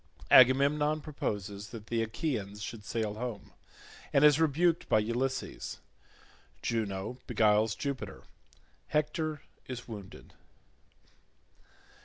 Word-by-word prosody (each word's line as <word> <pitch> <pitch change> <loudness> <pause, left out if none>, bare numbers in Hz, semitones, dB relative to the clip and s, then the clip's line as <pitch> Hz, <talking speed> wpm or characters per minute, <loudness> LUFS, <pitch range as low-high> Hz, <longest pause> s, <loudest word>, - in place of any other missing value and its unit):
Agamemnon 145 +4 +6
proposes 105 -9 -4
that 110 -3 -9
the 115 0 -1
Achaeans 110 -4 -3
should 110 -1 -6
sail 110 0 -2
home, 115 -1 -6 0.6
and 140 +2 +5
is 150 0 +6
rebuked 165 +2 +2
by - - +5
Ulysses—Juno 115 -2 -4
beguiles 110 0 +3
Jupiter—Hector 150 - -4 0.2
is 125 -2 -6
wounded. 100 -5 -10
120 Hz, 85 wpm, -31 LUFS, 105-145 Hz, 0.6 s, Agamemnon